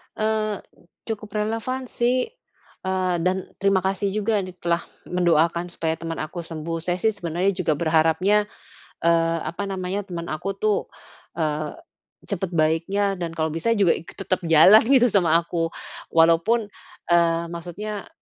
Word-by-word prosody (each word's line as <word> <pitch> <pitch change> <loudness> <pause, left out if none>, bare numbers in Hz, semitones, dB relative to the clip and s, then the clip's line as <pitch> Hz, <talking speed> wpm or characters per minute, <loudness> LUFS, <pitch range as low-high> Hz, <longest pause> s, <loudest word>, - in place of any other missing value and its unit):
Eee, 215 -1 -1 0.5
cukup 215 -2 -5
relevan 225 +4 -2
sih, 250 - 0 0.5
eee, 185 -1 0
dan 185 +2 -1
terima 195 -1 +2
kasih 195 +1 0
juga 215 0 +1
di 185 -2 -6
telah 170 -1 -1 0.2
mendoakan 170 -1 +2
supaya 165 -2 -2
temen 165 -1 -4
aku 170 +3 -5
sembuh. 165 0 -4
Saya 175 +2 -1
sih 220 - +3
sebenernya 180 0 -1
juga 180 -4 0
berharapnya, 165 +6 +2 0.6
eee, 165 0 +3
apa 175 +6 -4
namanya 190 +1 -3
temen 170 -2 -5
aku 195 +6 -3
tuh, 210 +1 +1 0.6
eee, 155 -2 -2 0.5
cepet 190 -3 -4
baiknya 180 +5 +1
dan 165 -2 -4
kalau 160 -1 -1
bisa 165 +9 0
juga 195 -5 +4
ik - - -4
tetep 190 -1 -1
jalan 165 +7 +8
gitu 250 -3 +5
sama 175 -5 +3
aku. 170 0 +1 0.4
Walaupun 170 +7 +3 0.4
eee, 170 -1 +3
maksudnya, 185 +5 -6
180 Hz, 140 wpm, -23 LUFS, 165-205 Hz, 0.6 s, jalan